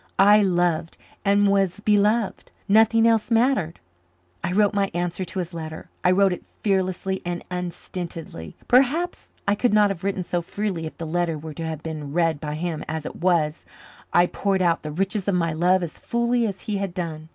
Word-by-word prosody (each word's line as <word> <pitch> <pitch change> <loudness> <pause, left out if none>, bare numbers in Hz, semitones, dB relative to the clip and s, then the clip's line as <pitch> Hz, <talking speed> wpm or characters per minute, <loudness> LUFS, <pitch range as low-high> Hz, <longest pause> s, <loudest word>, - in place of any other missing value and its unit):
I 205 +2 +7
loved 175 -4 +1 0.3
and 200 0 +4
was 195 -1 +1
beloved. 210 +1 +1 0.2
Nothing 225 +2 +5
else 225 -1 +2
mattered. 230 -8 +2 0.6
I - - -1
wrote 205 +2 +3
my 200 -1 +1
answer 175 +1 -2
to 185 +1 -7
his 180 -1 -3
letter. 160 -1 -7
I - - +4
wrote 190 0 +4
it - - -7
fearlessly 190 -1 -1
and 175 0 -4
unstintedly. 170 - -6
Perhaps 280 +8 +2 0.2
I 200 - +4
could 215 +1 +1
not 210 -1 +5
have 185 -2 -6
written 195 -1 -1
so 175 0 -2
freely 180 -2 -3
if - - -11
the 165 - -5
letter 165 0 -1
were 155 +1 -8
to 165 +1 -5
have 160 -1 -5
been 150 -3 -5
read 165 -3 +1
by 150 -1 -3
him; 165 0 -3
as 160 -1 -4
it - - -6
was, 165 -4 +1 0.5
I 175 - +5
poured 190 +1 0
out 170 -1 +2
the 155 - -5
riches 195 +5 -2
of 200 - +2
my 170 -2 +1
love 180 +3 +2
as 165 - -6
fully 235 0 +1
as 195 -3 -5
he 210 -2 -2
had 195 -3 -4
done. 160 -3 -5
180 Hz, 195 wpm, -24 LUFS, 165-205 Hz, 0.6 s, I